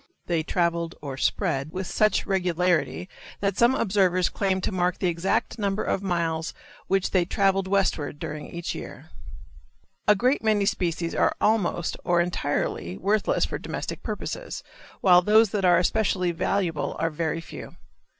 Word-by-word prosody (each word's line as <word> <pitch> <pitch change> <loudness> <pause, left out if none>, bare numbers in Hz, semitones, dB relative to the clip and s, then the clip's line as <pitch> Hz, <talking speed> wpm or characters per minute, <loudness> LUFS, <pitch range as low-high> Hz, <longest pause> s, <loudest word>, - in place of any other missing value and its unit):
They 170 -2 0
traveled, 170 0 -1
or 140 -3 -6
spread, 135 +2 -1
with 190 0 -3
such 215 +3 +2
regularity 180 -3 0 0.3
that 200 -1 0
some 240 +4 +4
observers 185 -3 +2
claimed 190 -2 -1
to - - 0
mark 180 -1 0
the 185 - +1
exact 175 +6 -1
number 200 0 0
of 195 - -1
miles 165 -4 -1 0.3
which 195 -1 +1
they 185 -2 +3
traveled 195 +1 +1
westward 190 -7 0
during 150 0 -6
each 170 0 -4
year. - - -9 1.0
A 210 - +7
great 250 +7 +1
many 215 -2 +2
species 170 -3 -1
are - - +2
almost, 200 -6 +1
or 175 -1 +2
entirely, 145 - -1
worthless 205 +2 +1
for - - -4
domestic - - -5
purposes, - - -5 0.4
while 180 -2 +7
those 215 +2 +4
that 200 -3 0
are 175 -1 +6
especially 185 -1 +1
valuable 170 -2 -1
are 165 0 0
very 160 +1 -2
few. 165 - -10
180 Hz, 150 wpm, -25 LUFS, 170-195 Hz, 1.0 s, A